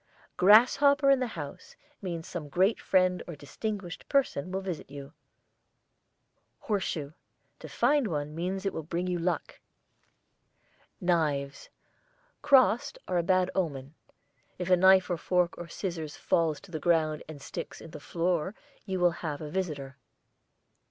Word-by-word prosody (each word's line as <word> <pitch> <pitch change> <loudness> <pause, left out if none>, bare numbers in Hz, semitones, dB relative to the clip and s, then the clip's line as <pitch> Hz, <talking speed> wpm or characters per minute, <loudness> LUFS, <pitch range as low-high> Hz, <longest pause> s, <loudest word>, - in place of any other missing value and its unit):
GRASSHOPPER 275 +8 +6
in 275 - +4
the 255 - 0
house 145 -2 -8 0.3
means 170 -4 -5
some 155 -4 -6
great 190 +9 +2
friend 185 -1 +2
or 170 - -6
distinguished 185 +5 -6
person 260 - +1
will 190 - -1
visit 180 -8 -5
you. 140 +1 -9 1.5
HORSESHOE. 170 -8 -2 0.5
To - - -9
find 275 +1 +2
one 150 -4 -3
means 185 +4 -3
it 195 - 0
will - - -3
bring 170 +3 -3
you 180 -1 -1
luck. 170 -1 -2 1.4
KNIVES 150 -6 0 0.7
crossed 270 -1 +4
are 180 -1 +1
a - - +3
bad 185 +1 +2
omen. 145 -6 -2 0.6
If 180 0 -3
a - - +8
knife 190 +1 +6
or 175 - -1
fork 180 +1 +1
or 175 - -6
scissors 170 -4 -5
falls 160 -3 +1
to 200 - -15
the 160 - -3
ground 155 -2 +1
and 155 -2 -8
sticks - - -7
in 165 - -11
the 150 - -8
floor 175 +4 -1 0.3
you 190 -1 -2
will 175 -1 +4
have 150 -4 -3
a 150 -1 -7
visitor. 145 -7 -4
175 Hz, 145 wpm, -29 LUFS, 155-190 Hz, 1.5 s, a